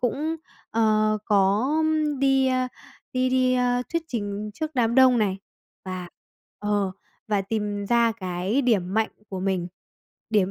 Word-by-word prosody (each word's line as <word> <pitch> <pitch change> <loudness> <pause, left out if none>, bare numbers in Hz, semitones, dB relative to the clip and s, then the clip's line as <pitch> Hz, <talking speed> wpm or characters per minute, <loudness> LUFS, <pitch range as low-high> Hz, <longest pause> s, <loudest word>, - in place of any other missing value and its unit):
cũng, 300 +7 -1 0.3
ờ, 215 -1 +2
có 205 +4 +3 0.5
đi, 270 -1 +3
a, 255 -1 +1 0.4
đi 255 0 +1
đi, 255 0 +3
a, 245 0 +1
thuyết 335 - 0
trình 210 -3 -3
trước 310 +7 -3
đám 235 -2 +2
đông 255 -2 +6
này, 195 -3 0 0.5
và 185 -1 -5 0.5
ờ, 205 -2 0 0.4
và 205 -2 +1
tìm 205 -1 -2
ra 235 -1 +4
cái 190 +5 -1
điểm 200 -6 +1
mạnh 220 0 +1 0.2
của 190 -1 -5
mình, 185 -2 -1 0.6
điểm 200 -3 +2
220 Hz, 145 wpm, -25 LUFS, 200-255 Hz, 0.6 s, đông